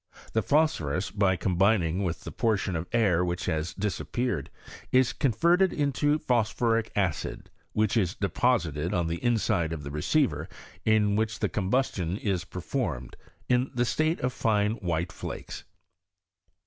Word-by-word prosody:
The 110 - +2
phosphorus 105 - +1
by 100 -2 +2
combining 90 0 +2
with 85 -3 -2
the - - -7
portion 105 -5 0
of 80 +2 -3
air 95 -7 +3
which 90 0 -2
has 80 +1 -2
disappeared, 105 - -2 0.4
is 130 -1 +4
converted 170 - +3
into 145 +1 +1
phosphoric 115 -3 +1
acid, 95 -6 -2 0.2
which 110 0 +1
is 95 -6 +1
deposited 90 - 0
on 85 -2 +1
the 85 +5 -3
inside 110 -8 +1
of 80 -2 -4
tlie 70 - -6
recdvet 130 - +1 0.4
in 105 -2 +3
which 110 +1 0
the - - 0
combustion 95 -4 0
is 95 -5 -1
performed, 65 -8 -4 0.3
in 125 +1 +2
the 120 0 +2
state 155 +8 +1
of 125 0 0
fine 105 -3 +1
white 85 -2 -2
flakes. - - -7
105 Hz, 140 wpm, -28 LUFS, 85-120 Hz, 0.4 s, is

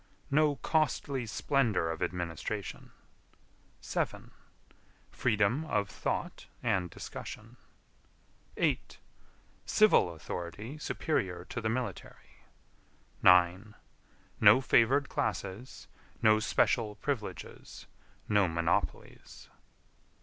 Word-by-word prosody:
No 150 0 +3
costly 140 -5 0
splendor 110 - +1
of 80 - -6
administration. 85 -3 -4 0.9
7. - - -3 0.8
Freedom 115 +4 +1
of 105 -8 -1
thought - - -4 0.2
and 95 -7 0
discussion. - - -9 1.0
8. - - 0 0.7
Civil 215 - +4
authority 90 - -6
superior 95 - -2
to 115 - -4
the 110 - -1
military. 125 +2 -6 0.8
9. 90 +4 +4 0.6
No - - +8
favored 135 +2 +3
classes; 105 +3 -4 0.3
no 110 0 +5
special 110 -1 +1
privileges; 105 - -5 0.4
no 105 -3 +3
monopolies. 85 0 -3
110 Hz, 80 wpm, -31 LUFS, 90-130 Hz, 1.0 s, No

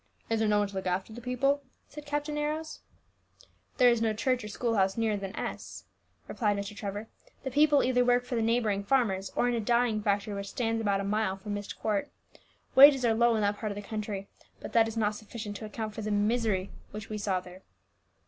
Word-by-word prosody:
"Is 225 - +2
there 220 -1 +2
no 210 - +3
one 205 0 +2
to 200 - -12
look 190 -1 -3
after 185 +4 -2
the 240 - -8
people?" 275 +4 +1 0.3
asked 300 -1 -9
Captain 295 +1 -2
Arrows. 305 +2 -3 1.0
"There 250 -2 +6
is 235 -1 +1
no 225 -1 +2
church 250 +2 0
or - - -5
school 230 +3 -2
house 195 -1 +2
nearer 225 -2 +1
than 195 0 -5
S - - -6 0.2
," - - -39
replied 210 -4 0
Mr. 200 +1 -5
Trevor. 205 +2 -5 0.4
"The 265 - -3
people 290 +1 +4
either 250 -1 +3
work 245 0 +3
for 250 - -6
the 230 - +1
neighbouring 220 -3 +1
farmers, 200 -5 +1
or 245 - +2
in 245 - +1
a 235 - 0
dyeing 235 -1 +1
factory 205 0 0
which 200 0 -5
stands 225 -1 -1
about 200 -2 +1
a - - -3
mile 200 -1 0
from 205 +2 -6
Myst 205 0 -5
Court. 215 +6 -1 0.6
Wages 270 -1 +8
are 230 - +4
low 235 +1 +3
in 215 - 0
that 205 0 0
part 215 -2 -3
of - - -5
the 205 - -6
country; 210 -3 -4 0.3
but - - -8
that 225 -1 +5
is 225 0 -6
not 210 -1 +1
sufficient 215 0 -7
to 220 - -7
account 215 0 -5
for 220 - -6
the 215 - -3
misery 210 -2 +1 0.2
which 210 -1 -8
we 215 -1 -4
saw 195 -2 0
there. 180 +1 -13
220 Hz, 230 wpm, -29 LUFS, 205-245 Hz, 1.0 s, Wages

